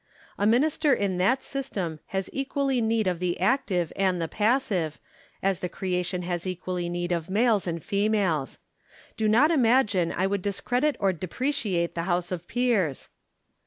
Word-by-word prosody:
A 205 - +3
minister 285 +4 +3
in 190 -3 -1
that 245 +9 +2
system 195 - -3
has 190 -1 -2
equally 270 -1 0
need 225 -1 +1
of 180 -2 0
the 180 -1 -1
active 190 - +1
and 190 -2 +1
the 165 - -1
passive, 205 - 0 0.5
as 195 -2 +1
the 180 - -3
crea 180 -1 -2
tion 180 0 -3
has 175 0 -3
equally 180 -1 -3
need 175 0 -3
of 170 -1 -2
males 215 -1 +2
and 170 -2 -3
females. 200 - 0 0.6
Do 220 - 0
not 250 +9 +5
imagine 230 - +3
I 185 - 0
would 200 0 0
discredit 245 +9 0
or 195 -1 +2
depreciate 190 - -2
the 170 - -2
House 175 0 0
of 175 -1 -4
Peers. 230 - 0
195 Hz, 160 wpm, -26 LUFS, 175-235 Hz, 0.6 s, not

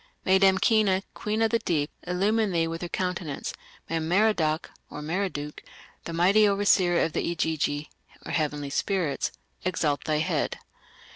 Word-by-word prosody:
"May 190 +1 +5
Damkina, 195 0 +4
queen 215 +1 -1
of 225 - +2
the 230 - +2
deep, 150 -7 -1 0.2
illumine 205 +4 +1
thee 165 -2 +1
with 165 0 -5
her 175 - -4
countenance; 180 -6 -3 0.3
may 165 - -1
Merodach 165 -2 +1 0.2
(Marduk), 150 -1 -3 0.4
the - - -5
mighty 195 +6 +5
overseer 195 -3 +3
of 160 - -1
the - - 0
Igigi 155 -2 -1 0.4
(heavenly 150 -3 -2
spirits), 180 -3 0 0.3
exalt 160 -5 0
thy 155 -1 +1
head." 155 - -1
175 Hz, 135 wpm, -27 LUFS, 155-195 Hz, 0.4 s, May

